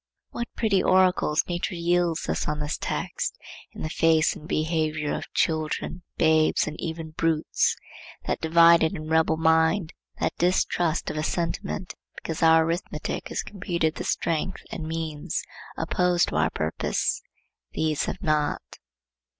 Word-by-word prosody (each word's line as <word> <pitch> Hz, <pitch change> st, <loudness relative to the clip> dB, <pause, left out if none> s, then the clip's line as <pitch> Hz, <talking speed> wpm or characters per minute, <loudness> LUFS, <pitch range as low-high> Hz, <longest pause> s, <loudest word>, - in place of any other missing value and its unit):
What 235 Hz, -, -4 dB
pretty 200 Hz, -4 st, +2 dB
oracles 185 Hz, -4 st, +3 dB
nature 175 Hz, +1 st, -2 dB
yields 170 Hz, -1 st, +1 dB
us -, -, -1 dB
on 150 Hz, 0 st, -2 dB
this 150 Hz, 0 st, -2 dB
text -, -, -3 dB, 0.3 s
in -, -, -8 dB
the 155 Hz, -, -2 dB
face 160 Hz, -1 st, +3 dB
and 155 Hz, -, -11 dB
behavior 155 Hz, -2 st, 0 dB
of -, -, -5 dB
children, 160 Hz, +2 st, -1 dB, 0.2 s
babes, 160 Hz, -1 st, +3 dB
and 155 Hz, -, -5 dB
even 160 Hz, -1 st, -5 dB
brutes! 160 Hz, 0 st, +1 dB, 0.5 s
That -, -, -2 dB
divided 165 Hz, 0 st, +5 dB
and 155 Hz, -3 st, -6 dB
rebel 160 Hz, 0 st, +3 dB
mind, 160 Hz, +2 st, +2 dB, 0.3 s
that -, -, 0 dB
distrust 175 Hz, -2 st, +1 dB
of -, -, -6 dB
a 155 Hz, -, -1 dB
sentiment 175 Hz, +3 st, -2 dB, 0.2 s
because 160 Hz, -, -5 dB
our 160 Hz, 0 st, +6 dB
arithmetic 165 Hz, -2 st, -3 dB
has -, -, -3 dB
computed 175 Hz, -5 st, -1 dB
the -, -, -5 dB
strength 165 Hz, +3 st, -1 dB
and 160 Hz, -2 st, -5 dB
means 160 Hz, -2 st, -3 dB, 0.3 s
opposed 180 Hz, -1 st, +2 dB
to -, -, -5 dB
our 80 Hz, 0 st, +3 dB
purpose, 80 Hz, 0 st, -1 dB, 0.5 s
these 155 Hz, -2 st, 0 dB
have 190 Hz, -, -5 dB
not. 150 Hz, -1 st, -1 dB
160 Hz, 140 wpm, -26 LUFS, 155-175 Hz, 0.5 s, our